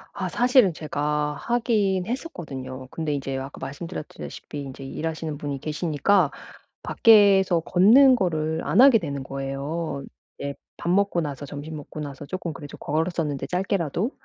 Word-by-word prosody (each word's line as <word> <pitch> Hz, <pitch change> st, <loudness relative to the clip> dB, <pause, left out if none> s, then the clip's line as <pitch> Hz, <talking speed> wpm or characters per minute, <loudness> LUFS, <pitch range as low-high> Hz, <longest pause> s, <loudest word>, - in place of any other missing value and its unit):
아 -, -, -3 dB
사실은 245 Hz, -6 st, +4 dB
제가 150 Hz, -1 st, -1 dB
하긴 215 Hz, -6 st, +1 dB
했었거든요. 135 Hz, -, -6 dB
근데 155 Hz, -3 st, -2 dB
이제 135 Hz, -1 st, -3 dB
아까 135 Hz, +1 st, -7 dB
말씀드렸다시피 145 Hz, 0 st, -7 dB
인제 135 Hz, -1 st, -8 dB
일하시는 155 Hz, +1 st, -4 dB
분이 145 Hz, -2 st, -4 dB
계시니까 155 Hz, +3 st, +1 dB, 0.5 s
밖에서 195 Hz, -5 st, +5 dB
걷는 235 Hz, -, +6 dB
거를 160 Hz, -6 st, -1 dB
안 150 Hz, +9 st, +1 dB
하게 260 Hz, -4 st, +8 dB
되는 140 Hz, -6 st, -4 dB
거예요. 135 Hz, +3 st, -4 dB, 0.4 s
예. 140 Hz, 0 st, -3 dB, 0.2 s
밥 170 Hz, -, -4 dB
먹고 195 Hz, -1 st, +2 dB
나서 145 Hz, -2 st, -5 dB
점심 145 Hz, +3 st, -7 dB
먹고 150 Hz, +1 st, -9 dB
나서 145 Hz, -1 st, -6 dB
쪼끔 175 Hz, -2 st, -4 dB
그래도 145 Hz, 0 st, -9 dB
걸었었는데 155 Hz, -2 st, -2 dB
짧게라도. 185 Hz, -, -1 dB
160 Hz, 335 characters per minute, -24 LUFS, 145-190 Hz, 0.5 s, 하게